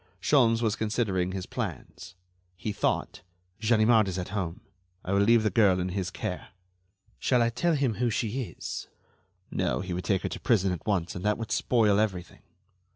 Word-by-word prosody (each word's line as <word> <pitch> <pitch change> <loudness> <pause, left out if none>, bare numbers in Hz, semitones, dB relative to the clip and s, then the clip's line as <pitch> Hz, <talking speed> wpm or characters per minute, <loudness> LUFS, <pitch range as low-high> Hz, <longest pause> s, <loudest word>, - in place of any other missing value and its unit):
Sholmes 115 0 +3
was 110 -3 +1
considering 105 -5 -1
his 95 -1 -4
plans. 90 +2 -6 0.4
He 105 - -3
thought: - - -1 0.4
"Ganimard 110 -1 +4
is 95 -1 -3
at 90 - -4
home. 95 -4 -3 0.4
I 95 - -1
will 100 - +3
leave 115 +2 +5
the 105 - +1
girl 95 -3 +4
in 90 +1 -1
his 95 -1 -2
care. 90 -1 -5 0.7
Shall 125 -2 +3
I 115 - +1
tell 170 +7 +1
him 135 -5 +1
who 120 +3 0
she 115 +3 -1
is? - - -6 0.6
No, - - 0
he 90 -1 -4
would 90 +1 -3
take 95 0 0
her - - -1
to - - -6
prison 100 -5 +2
at 90 +2 -6
once, 90 -5 0
and 90 - -6
that 105 0 +1
would 115 -1 -6
spoil 105 -4 +3
everything. 95 -5 -2
105 Hz, 185 wpm, -28 LUFS, 95-115 Hz, 0.7 s, leave